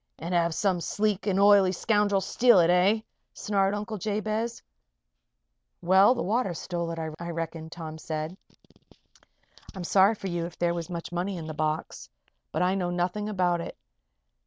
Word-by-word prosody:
"And 170 +3 -5
have 170 -1 +1
some 185 -4 0
sleek 210 +2 -1
and 195 -1 +1
oily 200 -2 +6
scoundrel 205 +1 +1
steal 235 0 +4
it, 170 0 +4
eh?" 190 +5 +3 0.3
snarled 200 -1 0
Uncle 210 0 -5
Jabez. 215 +3 -2 1.2
"Well, 190 +7 +5
the 245 - -2
water 210 -3 0
stole 170 0 -4
it, 165 - -5 0.2
I 170 0 -5
reckon," 165 -1 -5
Tom 160 -2 -8
said. 155 +1 -4 1.4
"I'm 185 - -5
sorry 195 +4 +4
for 195 - -6
you 170 -2 -2
if 170 - -13
there 170 0 +1
was 170 0 -5
much 170 -1 -6
money 180 +2 -2
in 165 - -6
the 155 - -5
box. 155 - -3 0.4
But - - 0
I 180 +1 +2
know 185 -2 -1
nothing 180 +4 -2
about 180 -4 +1
it. - - -8
180 Hz, 165 wpm, -27 LUFS, 170-205 Hz, 1.4 s, oily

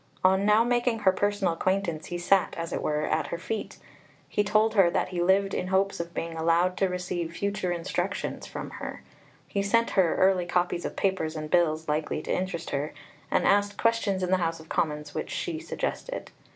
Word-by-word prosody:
On 190 +2 +4
now 210 +2 +6
making 240 -1 +1
her 190 - +5
personal 205 -2 0
acquaintance, 170 -3 -1
he 175 - -3
sat, 185 +2 +2
as 165 0 -4
it - - -2
were, 150 0 0
at 155 - 0
her 170 - -3
feet; 210 +5 -4 0.5
he 205 - +1
told 215 +2 +3
her 195 -5 +5
that - - 0
he 180 -2 -2
lived 195 +2 +3
in 180 - -1
hopes 190 +1 +1
of 170 0 -4
being 165 0 -3
allowed 170 +3 +2
to 195 - +2
receive 180 -2 -3
"future 200 -3 -1
instructions" 170 -1 -3
from - - -6
her; - - -7 0.4
he 200 - -1
sent 230 +4 +2
her 185 -5 +3
early 185 -2 +3
copies 175 0 0
of - - -4
papers 175 -5 0
and 155 -1 -5
bills 160 -3 +2
likely 150 0 -1
to - - -1
interest 185 -2 -3
her, 145 +2 -2 0.3
and - - +2
asked 205 0 +3
questions 225 -5 +1
in 180 - -1
the 185 - +5
House 165 -2 -1
of 160 - -14
Commons 150 -1 -1
which - - -4
she 340 -4 -3
suggested. - - -4
185 Hz, 200 wpm, -27 LUFS, 165-200 Hz, 0.5 s, now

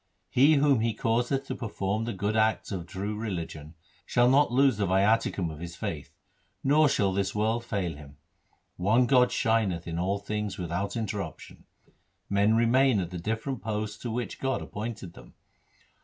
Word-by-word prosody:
He 140 +5 +5
whom 140 -3 +4
He 115 -1 0
causeth 120 +5 0
to - - -4
perform 105 -1 -3
the 120 - -3
good 100 +3 -2
acts 110 0 +1
of 90 -3 -4
true 100 +4 -4
religion, 85 -7 -5 0.3
Shall 120 0 +3
not 140 -1 +4
lose 130 -2 +4
the 100 -2 0
viaticum 95 -2 +2
of 75 - -10
his 85 0 -7
faith, - - -6 0.5
nor 150 +2 +4
shall 100 -7 +1
this 100 +1 -1
world 110 +3 0
fail 100 -7 -2
him. 70 -1 -13 0.6
One 110 +7 +3
God 125 -1 +4
shineth 105 -7 +1
in 85 0 -3
all 95 +3 0
things 105 0 -4
without 90 +4 -3
interruption. 105 -3 -5 0.7
Men 100 +2 +3
remain 120 +1 +4
at 90 -2 -3
the 90 - -5
different 115 +7 -3
posts 105 -1 -3
to 120 - -5
which 115 0 -4
God 135 0 -1
appointed 105 -5 -6
them. - - -15
105 Hz, 170 wpm, -28 LUFS, 95-120 Hz, 0.7 s, He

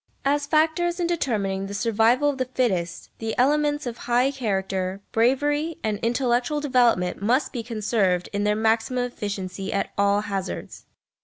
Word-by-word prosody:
As 290 +1 +1
factors 325 +3 +2
in 350 - +1
determining 205 - -1
the 200 - -6
survival 230 +5 +2
of 270 - -9
the 255 - +1
fittest, 180 -9 -1
the 225 -1 -3
elements 295 +3 +2
of 240 -1 -4
high 250 +3 +3
character, 195 -6 -2
bravery, 290 +7 +1
and 210 -2 -1
intellectual 245 +4 0
development 245 -11 +2
must 255 +6 +1
be 240 - -3
conserved 215 -5 0
in 205 0 0
their 210 0 +2
maximum 225 +3 +1
efficiency 195 -5 -4
at 200 - -1
all 200 0 +3
hazards. 195 -2 -5
230 Hz, 150 wpm, -24 LUFS, 200-270 Hz, -, high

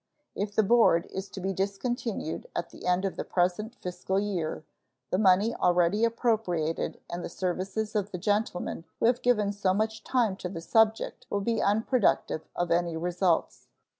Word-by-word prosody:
If 205 0 -3
the 220 - +4
board 205 -6 +4
is 190 +1 -5
to - - -8
be 190 +1 -2
discontinued 200 -1 -3
at 170 - -3
the - - -8
end 180 +2 +2
of 195 - -3
the - - -2
present 185 +6 0
fiscal 190 -1 -2
year, 180 -7 -2 0.5
the 185 - +2
money 200 +3 +4
already 180 +4 +3
appropriated 220 -9 0
and 175 0 -5
the - - -4
services 190 +4 -3
of 205 -1 0
the 185 - -5
gentlemen 205 -3 -1
who - - +2
have 240 +1 +3
given 210 -5 +2
so 190 -2 +1
much 220 +1 -1
time 235 -7 +1
to 180 - -5
the 175 - -6
subject 220 +5 +1
will 200 - -1
be 225 +2 0
unproductive 210 -6 +1
of 175 -1 -1
any 170 -1 +1
results. 175 0 0
195 Hz, 170 wpm, -28 LUFS, 180-220 Hz, 0.5 s, the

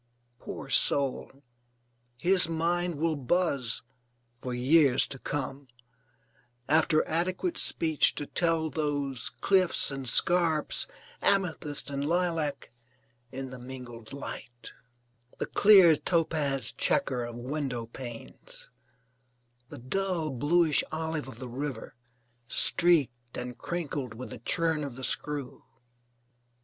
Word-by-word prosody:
Poor - - -8
soul, 140 0 +3 0.8
his 180 0 +4
mind 170 +1 0
will 160 +2 0
buzz 140 -4 0 0.6
(for 125 - -5
years 130 +2 +4
to 135 - -6
come) 140 0 -4 1.0
after 155 +1 +3
adequate 185 - -1
speech 160 - +2
to 145 - -4
tell 165 -1 0
those 145 -5 -2
cliffs 185 -6 +3
and 135 -2 -2
scarps, 165 0 +2 0.3
amethyst 160 -8 0
and 140 0 -3
lilac 165 -3 -1 0.6
in 130 0 -6
the 130 - -9
mingled 120 -3 -10
light; 120 -4 -8 0.7
the - - -2
clear 190 -6 +6
topaz 150 -5 -1
chequer 125 -2 0
of 120 0 -6
window 125 -1 -4
panes; 135 - -10 1.0
the - - -9
dull 165 +4 -2
bluish 150 +4 +3
olive 160 -2 -3
of 130 - -10
the 130 +1 -7
river, 130 0 -5 0.5
streaked 130 -7 +1
and 125 0 -6
crinkled 145 -8 -4
with 125 +3 -8
the 125 - -8
churn 160 +5 0
of 140 -4 -6
the 130 - -9
screw! 145 -1 -2
145 Hz, 110 wpm, -28 LUFS, 130-165 Hz, 1.0 s, clear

